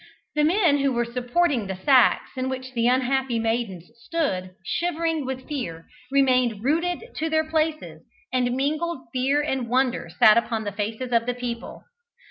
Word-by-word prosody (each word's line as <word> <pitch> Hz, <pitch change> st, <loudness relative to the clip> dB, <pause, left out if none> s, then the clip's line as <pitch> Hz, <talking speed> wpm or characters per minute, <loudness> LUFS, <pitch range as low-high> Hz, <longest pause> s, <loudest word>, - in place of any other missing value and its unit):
The 300 Hz, -, +2 dB
men 330 Hz, -3 st, +3 dB
who 275 Hz, 0 st, +2 dB
were 240 Hz, -1 st, 0 dB
supporting 245 Hz, -, 0 dB
the 190 Hz, -, -3 dB
sacks 255 Hz, +6 st, +3 dB
in 260 Hz, 0 st, -2 dB
which 260 Hz, 0 st, -5 dB
the 235 Hz, -1 st, +1 dB
unhappy 260 Hz, 0 st, +1 dB
maidens 225 Hz, -5 st, -2 dB
stood, 220 Hz, -, -1 dB, 0.2 s
shivering 325 Hz, -, -1 dB
with 260 Hz, 0 st, -5 dB
fear, 170 Hz, -, -5 dB, 0.3 s
remained 255 Hz, -6 st, +2 dB
rooted 345 Hz, -, -1 dB
to 320 Hz, +1 st, -1 dB
their 315 Hz, 0 st, +1 dB
places, 310 Hz, -, -1 dB, 0.3 s
and 250 Hz, -1 st, +1 dB
mingled 305 Hz, +3 st, -1 dB
fear 270 Hz, +3 st, +1 dB
and 265 Hz, -5 st, -2 dB
wonder 255 Hz, 0 st, +1 dB
sat 215 Hz, +1 st, +7 dB
upon 225 Hz, -1 st, -3 dB
the 205 Hz, -, -3 dB
faces 220 Hz, +5 st, -4 dB
of 230 Hz, 0 st, +2 dB
the 245 Hz, -, -1 dB
people. 240 Hz, -1 st, -6 dB
255 Hz, 160 wpm, -24 LUFS, 235-300 Hz, 0.3 s, sat